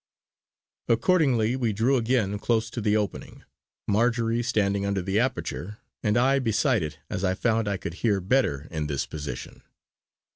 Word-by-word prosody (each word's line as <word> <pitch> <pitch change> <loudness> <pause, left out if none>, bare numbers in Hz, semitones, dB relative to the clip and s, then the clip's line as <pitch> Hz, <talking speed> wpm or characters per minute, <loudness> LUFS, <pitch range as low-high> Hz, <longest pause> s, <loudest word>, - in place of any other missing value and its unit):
Accordingly 125 -3 +3
we 120 -4 0
drew 115 +7 +2
again 115 -5 +1
close 110 0 0
to 120 - -4
the 105 0 +2
opening, 105 -2 -4 0.4
Marjory 115 +2 +2
standing 100 -4 0
under 100 -2 -1
the 95 +3 +1
aperture, 105 -5 -2 0.2
and 105 +1 +1
I 135 +3 +3
beside 120 -1 +1
it 75 -2 -4
as 95 - -4
I 95 -1 +1
found 115 0 +1
I 100 -1 0
could 85 - -6
hear 105 -4 +2
better 90 - +1
in 80 -2 -2
this 70 -2 -2
position. 70 -5 -7
110 Hz, 155 wpm, -26 LUFS, 100-120 Hz, 0.4 s, Accordingly